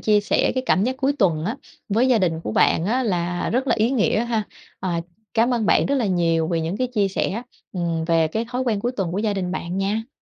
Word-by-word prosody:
chia 210 -1 +3
sẻ 205 - +1
cái 255 - 0
cảm 195 -4 +3
giác 260 +1 -1
cuối 275 +1 +1
tuần 165 -7 +2
á 225 +8 -2 0.3
với 230 +5 +2
gia 245 -3 +4
đình 165 -4 0
của 110 - -4
bạn 160 - +3
á 245 +6 +1
là 175 -5 -1
rất 255 +4 0
là - - +3
ý 225 +4 +2
nghĩa 230 -2 +2
ha. 230 -2 0 0.4
À, 175 -3 -1 0.3
cám 240 +2 +3
ơn 225 -3 0
bạn - - +4
rất 280 - +1
là 245 -6 +1
nhiều 165 -3 +1
vì 165 -2 0
những 165 +5 -2
cái 255 - 0
chia 215 -5 0
sẻ, 195 +4 -2 0.3
ừm, 170 -3 -1
về 165 -1 +2
cái 220 +8 -2
thói 250 +1 -2
quen 225 -5 0
cuối 245 +4 -1
tuần 190 -7 -2
của 195 - -1
gia 210 -1 0
đình 180 -2 -2
bạn 180 0 -3
nha. 215 +4 -1
205 Hz, 260 wpm, -22 LUFS, 175-240 Hz, 0.4 s, gia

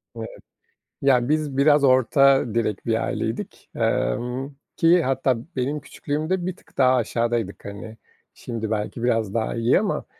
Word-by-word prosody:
Evet. - - -6 0.7
Ya, 130 -3 +3
biz 150 -3 0
biraz 145 0 +4
orta 135 -2 +4
direk 110 -4 -1
bir - - 0
aileydik, - - -4
emm, 125 - -1 0.3
ki 170 +1 +4
hatta 130 -2 +1 0.2
benim 140 +3 -1
küçüklüğümde 155 +6 -3
bir 185 - -3
tık - - -25
daha 130 -1 +5
aşağıdaydık. 115 -3 -1
Hani 100 +2 -8 0.4
şimdi 115 -2 -5
belki 110 +2 -3
biraz 115 -4 0
daha 115 -1 -1
iyi 115 +5 +3
ama, 205 0 -2
130 Hz, 140 wpm, -23 LUFS, 115-145 Hz, 0.7 s, daha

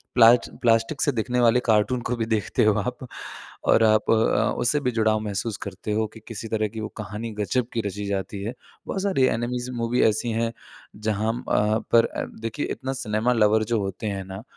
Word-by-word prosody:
प्ला 115 -1 +8 0.3
प्लास्टिक 115 +4 +2
से 145 - +3
दिखने 125 +2 -1
वाले 120 0 +5
कार्टून 115 +3 +2
को 125 - 0
भी 115 - -1
देखते 110 -2 0
हो 110 - +5
आप, 125 +5 -3 0.7
और 115 - +4
आप 110 0 +3
अ, - - +6 0.4
उससे 145 +5 +1
भी 130 -3 0
जुड़ाव 110 -1 +2
महसूस 105 +1 -3
करते 100 +2 -5
हो 110 +1 +1
कि 110 - -11
किसी 115 -1 -6
तरह 110 -1 0
की 110 +2 -7
वो 110 - -4
कहानी 110 +2 -5
ग़ज़ब 115 +4 0
की 115 - -1
रची 100 +1 -4
जाती 100 0 -3
है। 110 +4 -3 0.3
बहुत 190 - -3
सारी 190 -10 +2
एनीमेज़ 125 +1 -2
मूवी 120 0 0
ऐसी 110 +2 +2
है 115 +1 0 0.4
जहाँ 110 +1 -1
म 120 - -5
अ, 105 +1 +1
पर 115 -1 +6 0.3
देखिए 115 +6 -3
इतना 135 0 -4
सिनेमा 115 -1 0
लवर 110 -1 +3
जो 115 - +3
होते 95 +2 -4
हैं 100 -2 -3
ना 95 +2 -8
110 Hz, 200 wpm, -24 LUFS, 105-120 Hz, 0.7 s, प्ला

